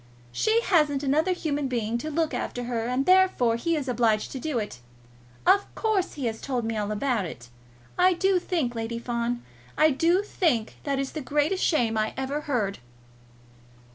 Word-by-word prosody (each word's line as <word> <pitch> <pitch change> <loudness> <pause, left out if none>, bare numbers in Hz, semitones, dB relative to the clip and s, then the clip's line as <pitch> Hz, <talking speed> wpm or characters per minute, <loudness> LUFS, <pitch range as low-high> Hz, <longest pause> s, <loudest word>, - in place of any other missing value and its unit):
She 440 - +2
hasn't 300 - +2
another 305 +6 +2
human 295 -5 -1
being 235 -2 -1
to 310 - -4
look 315 -1 0
after 245 0 -3
her, 235 -1 -2
and, 255 +2 0
therefore, 370 -11 +4
he 330 +8 0
is 290 -3 -3
obliged 225 -3 +1
to 265 - -5
do 305 -2 -2
it. 210 - -4 0.7
Of 400 +1 +4
course 425 -5 0
he 280 -4 -4
has 225 -1 -3
told 250 -4 -2
me 225 0 -2
all 210 -1 -2
about 220 -1 0
it. 125 -7 -9 0.5
I 365 +1 +6
do 380 +1 +2
think, 320 -9 -1
Lady 230 0 -3
Fawn, 235 0 -2 0.3
I 310 0 +5
do 340 +8 +2
think 305 - 0
that 280 -2 0
is 270 0 -2
the 310 - -5
greatest 295 +7 0
shame 230 -9 +2
I 215 0 -1
ever 270 +3 -2
heard!" 225 -10 -1
270 Hz, 180 wpm, -26 LUFS, 235-320 Hz, 0.7 s, I